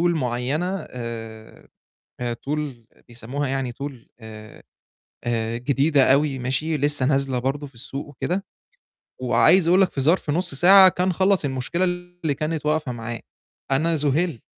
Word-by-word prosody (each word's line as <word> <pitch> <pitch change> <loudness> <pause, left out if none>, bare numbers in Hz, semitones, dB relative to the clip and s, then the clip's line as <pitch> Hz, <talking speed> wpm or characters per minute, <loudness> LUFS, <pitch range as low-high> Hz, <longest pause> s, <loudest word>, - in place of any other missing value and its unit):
معيّنة 140 +8 -1
آآ 115 -2 -8 0.5
هي 120 -1 -2
tool 145 +5 -4 0.4
آآ - - -25
بيسمّوها 125 +4 -4
يعني 135 -2 -2
tool 140 +3 -6 0.3
آآ، 110 -1 -12 0.6
آآ، 115 -1 -1
جديدة 140 +2 +3
أوي 140 -1 +1
ماشي، 135 +5 -1
لسّه 145 -2 +2
نازلة 135 -2 +1
برضه 140 +3 -3
في 135 - -21
السوق 135 +4 -6
وكده 180 - -3 0.8
وعايز 185 -2 +4
أقول 180 +3 +5
لك 190 - +3
في 135 - -2
ظرف 160 +3 +2
نُص 170 +1 +1
ساعة 190 +5 +8
كان 180 0 -1
خلّص 190 -2 +2
المشكلة 135 +6 -2
اللي 175 -3 -2
كانت 155 +1 -3
واقفة 150 -3 0
معاه. 115 0 -6 0.5
أنا 160 +5 +2
زُهِلت، 150 -1 0
140 Hz, 145 wpm, -23 LUFS, 125-165 Hz, 0.8 s, ساعة